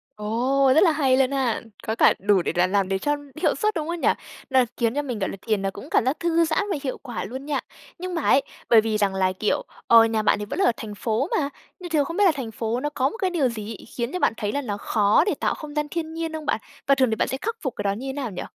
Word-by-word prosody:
Ồ, 250 +6 +2
rất 315 - +6
là 335 - +5
hay 270 -4 +2
luôn 265 0 +3
ha! 260 -5 0 0.3
Có 220 - 0
cả - - +5
đủ 200 -1 +3
để - - -1
là 180 +1 +3
làm 195 0 +1
để 195 - +1
cho 290 +6 +1 0.3
hiệu - - +2
suất, 425 0 0
đúng 315 -1 -2
không 340 0 -3
nhỉ? - - +2 0.4
Nó 265 - +4 0.2
khiến 230 0 +1
cho 290 - +1
mình, 250 -6 -4
gọi 190 - -1
là, - - -6
thiền 215 -3 0
là 195 - 0
cũng 200 +1 -10
cảm - - +2
giác 265 +4 0
thư 335 -1 +2
giãn 315 +4 +1
và 350 - 0
hiệu 260 - -3
quả 245 -7 -6
luôn 260 +7 -7
nha. 290 -2 -1 0.4
Nhưng 365 0 -4
mà 335 - -1
ấy, 275 - +4 0.3
bởi 225 -2 +7
vì 220 -1 -1
rằng 200 -2 +1
là, 185 -1 +2
kiểu, 215 - +1 0.3
ờ, 230 -1 +8
nhà 225 -1 0
bạn 215 - +2
thì 210 - -4
vẫn 205 - -5
là 390 - +4
ở - - +5
thành 210 -2 -7
phố 230 - -1
mà, 280 -2 -1 0.3
nhưng 355 - -7
thường 300 -4 +2
không 335 +5 -5
biết 410 - +4
là 360 - +6
thành 245 -5 -5
phố 225 +2 -2
nó 295 - -2
có 275 -2 0
một 450 - -9
cái 380 -4 0
điều 300 -8 +1
gì 215 -1 -6
ấy, - - -13
khiến 240 +2 -2
cho 365 - -2
bạn - - +2
thấy 205 -1 -2
là 285 - -1
nó 205 -6 -4
khó 210 +5 +3
để 405 - +1
tạo - - +1
không 300 -1 -9
gian 300 0 0
thiên 320 -1 -4
nhiên 325 0 -4
không 315 -1 -5
bạn? - - 0 0.3
Và 275 - +5
thường 260 -2 +3
thì 220 - 0
bạn - - 0
sẽ 265 - -2
khắc 455 +2 -2
phục 265 -5 -3
cái - - -4
đó 200 - +1
như 235 +7 -5
thế 265 - -3
nào 265 -6 -4
nhỉ? 180 - -5
260 Hz, 315 wpm, -24 LUFS, 215-305 Hz, 0.4 s, ờ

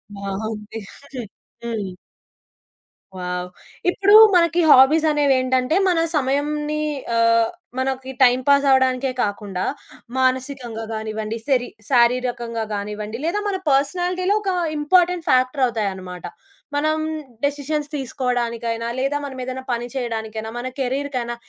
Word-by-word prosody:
బావుంది. 210 +2 -5 0.8
హ్మ్. 210 -6 -4 1.2
వావ్! 180 0 -3 0.4
ఇప్పుడు 400 +3 +4 0.2
మనకి 340 0 +4
హాబీసనేవేంటంటే, 270 -2 +4
మన 345 -2 +2 0.2
సమయంని 295 +2 0 0.4
ఆహ్, 230 0 +4 0.3
మనకి 265 0 -2
టైమ్ 250 0 +5
పాస్ 280 0 +5
అవ్వడానికే 260 0 +2
కాకుండా, 200 -2 -3 0.5
మానసికంగా 255 -3 -1
గానివ్వండి, 220 0 -4
శరీ 250 -3 +2 0.2
శారీరకంగా 240 -2 +2
గానివ్వండి, 210 +2 -5
లేదా 410 +5 0
మన 390 - -1
పర్సనాలిటీలో 360 +7 +1
ఒక 385 -2 0 0.3
ఇంపార్టెంట్ 350 +2 +2
ఫ్యాక్టరవుతాయన్నమాట. 220 -9 0 0.5
మనం 310 +2 +1 0.5
డెసిషన్స్ 290 +1 -1
తీసుకోవడానికైనా, 235 -4 -2
లేదా 275 +2 0
మనం 275 -2 -6
ఏదైనా 260 +1 -5
పని 240 0 -1
చేయడానికైనా, 220 -3 -4
మన 245 +1 -4
కెరియర్‌కెయినా 260 -2 -2
255 Hz, 100 wpm, -21 LUFS, 225-285 Hz, 1.2 s, టైమ్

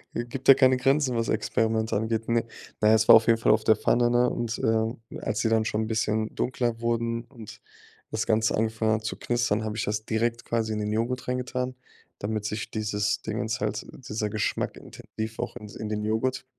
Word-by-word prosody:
G 120 - -1
Gibt 130 +2 -7
ja 135 - +10
keine 130 -1 +4
Grenzen, 135 0 +2
was 115 0 -1
Experimente 110 0 0
angeht, 110 +1 -1
ne? 115 0 +2 0.4
Na 105 - +4
ja, 110 - +7
es 110 0 +2
war - - +10
auf 115 - +5
jeden 115 -1 +5
Fall - - +3
auf 110 0 +3
der 110 - +5
Pfanne, 120 0 +2
ne? 120 +1 +3
Und, 120 -1 -2
ähm, 110 +1 +1 0.2
als - - -1
die 115 - +1
dann 110 -1 +2
schon 110 0 -1
'n 110 - -3
bisschen 110 -1 -1
dunkler 120 -2 -1
wurden 115 0 -1
und 110 -4 -12 0.5
das 110 -1 -2
Ganze 110 0 +2
angefangen 110 0 +1
hat 110 0 -2
zu 110 - -3
knistern, 120 -3 0
habe 110 0 -4
ich 105 - -1
das 105 +1 -2
direkt 115 +2 -1
quasi 110 -2 -1
in 105 - -2
den 105 0 -2
Joghurt 115 +4 -2
reingetan, 125 0 -2 0.4
damit 105 0 -3
sich 110 +1 -4
dieses 105 -1 -1
Dingens - - -3
halt - - -2 0.2
dieser 105 0 -2
Geschmack 110 - -2
intensiv 110 +1 -7
auch - - -4
in 105 -3 -9
in 105 +1 -6
den 105 0 -2
Joghurt 110 +5 -1
110 Hz, 215 wpm, -26 LUFS, 110-120 Hz, 0.5 s, ja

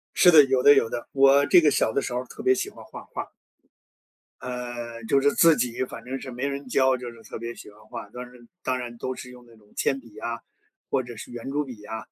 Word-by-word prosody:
是 180 - +7
的， 155 -3 +9
有 130 -1 +2
的 145 - +8
有 115 - +3
的。 120 - -5
我 140 +1 +5
这 180 +2 +6
个 150 -2 +4
小 - - +2
的 140 - 0
时 125 - -4
候 125 +1 -2
特 - - -10
别 385 - +5
喜 390 0 -2
欢 - - -13
画 - - -10
画 - - -2
儿。 - - -11 1.1
呃， 120 -2 -6
就 135 +5 +2
是 145 +1 +4
自 165 -2 +6
己 120 0 -1
反 115 - -10
正 130 +2 -5
是 130 - -8
没 125 +3 -3
人 140 -1 -5
教 130 0 +3
就 125 -1 -7
是 115 -1 -15
特 - - -8
别 115 +1 -5
喜 - - -12
欢 105 +1 -19
画， 110 -2 -8
但 125 0 -7
是 125 -1 -16 0.2
当 130 -1 -1
然 120 -1 -7
都 130 +2 -4
是 125 - -9
用 125 -1 -14
那 115 -1 -18
种 105 -2 -24
铅 135 - +1
笔 115 -5 -17
啊， 115 0 -4 0.5
或 130 - +1
者 120 -1 -9
是 110 - -9
圆 120 +2 -6
珠 145 +1 0
笔 120 -7 -10
啊， 110 +1 -5
125 Hz, 280 characters per minute, -25 LUFS, 120-135 Hz, 1.1 s, 的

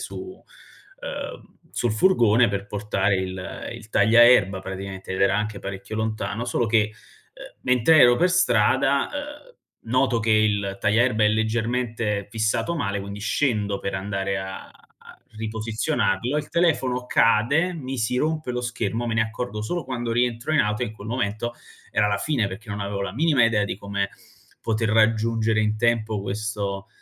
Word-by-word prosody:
su - - -7
uhm, - - -10 0.2
sul 120 -3 +1
furgone 115 - +4
per 100 0 -3
portare 100 -1 0
il 95 0 -5
il 115 -2 -11
tagliaerba, 110 -2 +5
praticamente, 95 0 -6
ed 95 - -3
era 95 0 +3
anche 105 0 -2
parecchio 100 +2 -6
lontano. 110 +1 -2
Solo 120 - 0
che, 105 -1 +2 0.4
uhm, - - -13
mentre 125 +6 +4
ero 120 0 +7
per 180 +5 +3
strada, 135 -4 +3 0.4
uhm, - - -26 0.4
noto 130 -1 +2
che 110 +1 0
il 105 -2 +2
tagliaerba 110 +1 +3
è - - +5
leggermente 110 -1 -1
fissato 110 +10 0
male, 100 -10 -2
quindi 100 +1 -7
scendo 105 -3 0
per 100 - -4
andare 95 0 -2
a 95 0 -7 0.4
a - - -14 0.2
riposizionarlo, 110 +2 -1
il 150 0 -3
telefono 130 -7 +1
cade, 140 +13 +3
mi 135 -4 -5
si 115 +1 -1
rompe 155 0 -1
lo 125 0 -2
schermo, 115 -1 -2
me 115 - -1
ne 110 - +2
accorgo 110 -1 -3
solo 165 +9 -3
quando 120 -2 -4
rientro 120 +4 0
in 155 - +3
auto 105 -2 +1
e, - - 0
in 105 - -7
quel 105 0 -11
momento, 115 -1 -2 0.4
era 105 - +2
la 100 - +1
fine 115 -1 0
perché 105 +4 -9
non 100 0 -4
avevo 100 0 -3
la 100 -2 -4
minima 145 0 +3
idea 115 -2 +2
di 100 - -4
come 100 0 -3 0.5
poter 110 0 -1
raggiungere 110 0 +2
in 105 0 0
tempo 110 -2 0
questo 100 0 -4
110 Hz, 165 wpm, -24 LUFS, 100-125 Hz, 0.5 s, ero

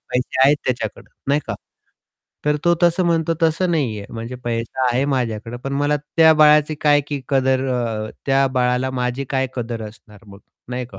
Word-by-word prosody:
पैसे 125 +1 -1
आहेत 145 +2 +5
त्याच्याकडं, 115 -5 -3 0.2
नाही 145 +1 +3
का? - - -3 0.9
तर 150 0 +2
तो 175 - +4
तसं 175 +2 +3
म्हणतो, 165 -1 +1
तसं 165 +3 +2
नाहीये. 120 -11 -1
म्हणजे 115 +2 -6
पैसा 120 +2 -2
आहे 130 +3 +1
माझ्याकडं 120 -4 -2
पण 135 - -3
मला 145 +1 +2 0.2
त्या 160 -1 +7
बाळाची 150 0 +5
काय 145 -1 +4
की 145 -2 -3
कदर 130 -1 +1
अ, 110 -3 -2 0.2
त्या 135 0 +3
बाळाला 125 +1 +1
माझी 125 +1 -2
काय 130 -1 +1
कदर 115 -2 -4
असणार 105 -1 -18
मग, 100 0 -14 0.3
नाही 125 0 -4
का? 100 -5 -13
130 Hz, 175 wpm, -20 LUFS, 120-150 Hz, 0.9 s, त्या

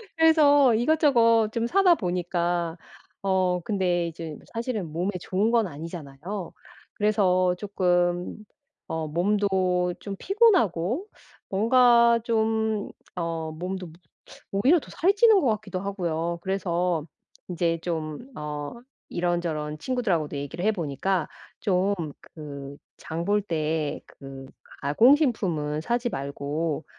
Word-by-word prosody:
그래서 290 -5 +5
이것저것 235 -5 +4
좀 230 +1 -1
사다 370 +3 +5
보니까 175 - -1 0.4
어 185 -2 +1
근데 180 -4 0
이젠 165 -2 -7
사실은 225 -8 -3
몸에 180 +5 -1
좋은 195 +6 0
건 230 -3 +3
아니잖아요. 165 +3 -7 0.4
그래서 185 -4 +2
조금 180 -3 0 0.5
어 160 -1 -3
몸도 180 0 +1
좀 200 -1 -6
피곤하고 350 - +2 0.4
뭔가 235 +2 +5
좀 220 -2 0 0.3
어 165 -2 -3
몸도 180 +3 -5
모 165 +1 -16 0.6
오히려 315 +7 +5
더 - - -14
살이 380 +5 +2
찌는 430 -1 +6
것 280 - -1
같기도 215 -4 -2
하고요. 170 -4 -2
그래서 180 -4 -1 0.4
이제 170 -1 0
좀 155 -3 -3 0.2
어 150 -1 -5 0.4
이런저런 170 -4 -1
친구들하고도 185 - -1
얘기를 145 +5 -5
해 220 - +3
보니까 170 0 -1 0.3
좀 195 +1 +1 0.3
그 140 -3 -9 0.2
장 165 +1 -5
볼 205 +3 +2
때 155 -4 -2
그 135 -1 -11 0.4
가공식품은 175 - +3
사지 240 +6 0
말고 145 +1 -3
180 Hz, 235 characters per minute, -26 LUFS, 165-220 Hz, 0.6 s, 찌는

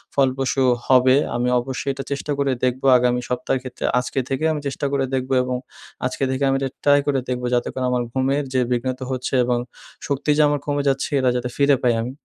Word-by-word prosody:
ফলপ্রসূ 135 0 +1 0.2
হবে। 130 0 +5 0.2
আমি 120 +1 0
অবশ্যই 130 +2 -4
এটা 135 - -6
চেষ্টা 140 +1 -3
করে 140 -1 +1
দেখবো 130 +1 0
আগামী 125 0 +1
সপ্তাহের 125 +1 -1
ক্ষেত্রে, 130 - -6
আজকে 130 +2 -2
থেকে 135 +3 -2
আমি 150 -2 -3
চেষ্টা 140 +1 -3
করে 135 -1 +1
দেখব 130 0 -1
এবং 125 0 -2 0.5
আজকে 130 +1 -2
থেকে 130 +1 -1
আমি 135 - +2
এটা 135 -1 -2
try 145 0 +5
করে 135 -2 +2
দেখবো 125 0 -2
যাতে 120 0 +1
করে 130 -1 -2
আমার 125 -1 +1
ঘুমের 135 +3 0
যে 130 - +2
বিঘ্নিত 130 +1 -1
হচ্ছে 130 +1 -3
এবং 120 0 0 0.5
শক্তি 140 +1 -2
যে - - +5
আমার 145 -1 0
কমে 145 -1 -1
যাচ্ছে 135 0 -1
এরা 130 -1 +2
যাতে 125 0 -2
ফিরে 140 0 +4
পাই 120 -1 +4
আমি। 120 +3 -4
130 Hz, 210 wpm, -21 LUFS, 125-140 Hz, 0.5 s, হবে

